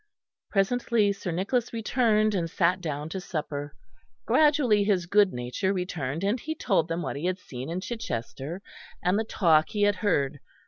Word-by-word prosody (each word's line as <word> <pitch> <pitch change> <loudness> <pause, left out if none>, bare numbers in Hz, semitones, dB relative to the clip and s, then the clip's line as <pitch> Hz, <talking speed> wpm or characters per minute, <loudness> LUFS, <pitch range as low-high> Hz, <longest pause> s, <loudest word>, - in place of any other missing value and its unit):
Presently 215 0 +2
Sir 195 -2 -6
Nicholas 200 +8 -1
returned, 220 -2 +2
and 170 -4 -1
sat 180 +2 +1
down 150 -3 -3
to 190 +3 -4
supper. 145 -5 -5 0.5
Gradually 255 -5 +4
his 195 -4 +1
good 200 +2 +4
nature 125 +11 -2
returned, 170 -4 -3
and 205 +5 +1
he 315 +6 -4
told 195 - +1
them 165 +1 -2
what - - -3
he 150 - -4
had 185 0 0
seen 130 -6 -8
in 175 +2 -3
Chichester, 170 - -5 0.4
and 185 +4 +2
the - - +1
talk 165 -8 +3
he 205 -1 0
had 205 -1 +3
heard. 145 -8 0
185 Hz, 170 wpm, -27 LUFS, 160-215 Hz, 0.5 s, Gradually